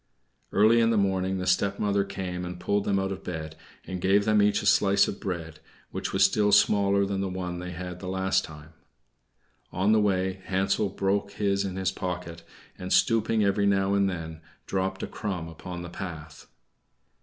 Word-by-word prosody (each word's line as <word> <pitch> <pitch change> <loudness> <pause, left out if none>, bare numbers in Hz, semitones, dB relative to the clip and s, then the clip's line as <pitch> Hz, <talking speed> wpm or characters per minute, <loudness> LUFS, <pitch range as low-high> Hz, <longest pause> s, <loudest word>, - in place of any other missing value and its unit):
Early 110 +3 +5
in 115 - +3
the 115 - +2
morning 95 -1 +1
the 90 - -3
stepmother 100 +2 +1
came 95 -2 -5
and 90 0 -6
pulled 100 +2 0
them 100 - +1
out 95 0 -1
of 95 - -6
bed, 80 -2 -6 0.3
and 95 -1 -5
gave 100 +2 +3
them 105 -1 +4
each 105 0 +2
a - - -5
slice 100 0 +4
of 100 - -5
bread, 85 -5 -5 0.3
which - - -4
was - - +3
still 105 -1 +2
smaller 100 -1 +4
than 100 0 -2
the 95 - -2
one 90 -1 -4
they 90 0 -6
had 90 0 -7
last 95 0 0
time. 75 +1 -11 1.0
On 95 +4 +1
the 110 -1 +4
way 95 -1 0
Hansel 95 +2 0
broke 100 +1 -1
his 100 -1 0
in 95 -2 -4
his 95 -1 0
pocket, 90 -3 -5 0.4
and, 90 0 -6
stooping 115 -1 +3
every 100 0 +2
now 100 0 +2
and 100 -1 +2
then, 80 -3 -6 0.2
dropped 95 0 -2
a - - -2
crumb 95 -6 -4
upon 85 +2 -8
the - - -6
path. 80 -5 -8
95 Hz, 185 wpm, -27 LUFS, 90-100 Hz, 1.0 s, Early